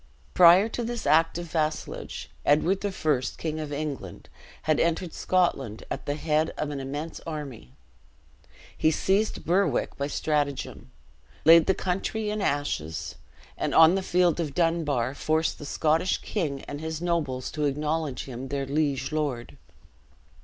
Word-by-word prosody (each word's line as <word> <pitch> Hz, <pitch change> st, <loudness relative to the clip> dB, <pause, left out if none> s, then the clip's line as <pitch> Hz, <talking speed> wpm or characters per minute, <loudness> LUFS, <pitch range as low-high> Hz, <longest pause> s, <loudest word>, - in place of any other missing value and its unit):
Prior 180 Hz, +4 st, +7 dB
to 235 Hz, +1 st, -4 dB
this 235 Hz, 0 st, -4 dB
act 165 Hz, +1 st, +3 dB
of 175 Hz, -, -4 dB
vassalage, 155 Hz, -1 st, -3 dB
Edward 175 Hz, +7 st, +2 dB
I., 155 Hz, -9 st, 0 dB, 0.2 s
King 155 Hz, -1 st, -3 dB
of 150 Hz, -2 st, -5 dB
England, 145 Hz, -1 st, -5 dB, 0.3 s
had 155 Hz, -1 st, +2 dB
entered 170 Hz, +1 st, 0 dB
Scotland 135 Hz, -, 0 dB
at -, -, -5 dB
the 145 Hz, -, 0 dB
head 155 Hz, +1 st, +1 dB
of 150 Hz, -, -2 dB
an 140 Hz, -, -4 dB
immense 145 Hz, +4 st, -5 dB
army. 140 Hz, -, -7 dB, 1.0 s
He 155 Hz, -, +3 dB
seized 195 Hz, +7 st, 0 dB
Berwick 175 Hz, -5 st, +1 dB
by 140 Hz, -, -1 dB
stratagem; 145 Hz, -2 st, -2 dB, 0.6 s
laid 165 Hz, +1 st, +8 dB
the 190 Hz, -, +3 dB
country 210 Hz, +4 st, -2 dB
in 210 Hz, 0 st, -2 dB
ashes; 140 Hz, -, -2 dB, 0.4 s
and, -, -, -2 dB
on 160 Hz, +1 st, +8 dB
the 195 Hz, -, +1 dB
field 180 Hz, -2 st, +2 dB
of 150 Hz, -5 st, -3 dB
Dunbar, 155 Hz, -8 st, +1 dB
forced 155 Hz, +2 st, 0 dB
the 145 Hz, -, -7 dB
Scottish 160 Hz, +5 st, +1 dB
king 150 Hz, -10 st, -2 dB
and 145 Hz, +1 st, -7 dB
his 160 Hz, 0 st, -4 dB
nobles 160 Hz, -7 st, -1 dB
to 150 Hz, -1 st, -1 dB
acknowledge 150 Hz, -1 st, -1 dB
him 130 Hz, 0 st, -7 dB
their 140 Hz, 0 st, -2 dB
liege 140 Hz, 0 st, -1 dB
lord. 145 Hz, -6 st, -2 dB
155 Hz, 145 wpm, -26 LUFS, 145-170 Hz, 1.0 s, laid